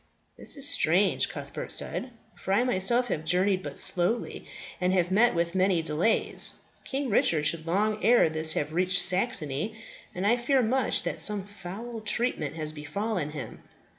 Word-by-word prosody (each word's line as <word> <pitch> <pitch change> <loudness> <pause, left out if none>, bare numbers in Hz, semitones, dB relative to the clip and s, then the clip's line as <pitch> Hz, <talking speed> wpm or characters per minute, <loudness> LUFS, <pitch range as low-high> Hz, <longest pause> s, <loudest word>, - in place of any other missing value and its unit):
"This - - -1
is 280 0 +3
strange," 185 - +2
Cuthbert - - -7
said, 255 - 0 0.3
"for 190 - -4
I 210 - +3
myself 245 +2 +1
have 155 - -3
journeyed 185 +3 +1
but 145 -5 -8
slowly, 180 +7 0 0.3
and 180 +1 +1
have 180 -1 0
met 225 +3 +3
with 170 0 -1
many 185 -3 +1
delays. 160 +7 +4 0.3
King 270 -2 -4
Richard 155 -6 +1
should 160 +1 -1
long 210 +5 -1
ere 235 0 +4
this 155 0 +1
have 150 +1 -3
reached 180 +2 +1
Saxony; 185 - -1 0.4
and 185 +2 -3
I 235 +4 +3
fear 255 +2 +1
much 255 +4 0
that - - -4
some 210 -2 +1
foul 205 +4 -9
treatment 210 - -2
has 155 -1 -3
befallen 155 +3 -4
him. 150 -1 -9
185 Hz, 165 wpm, -27 LUFS, 165-225 Hz, 0.4 s, delays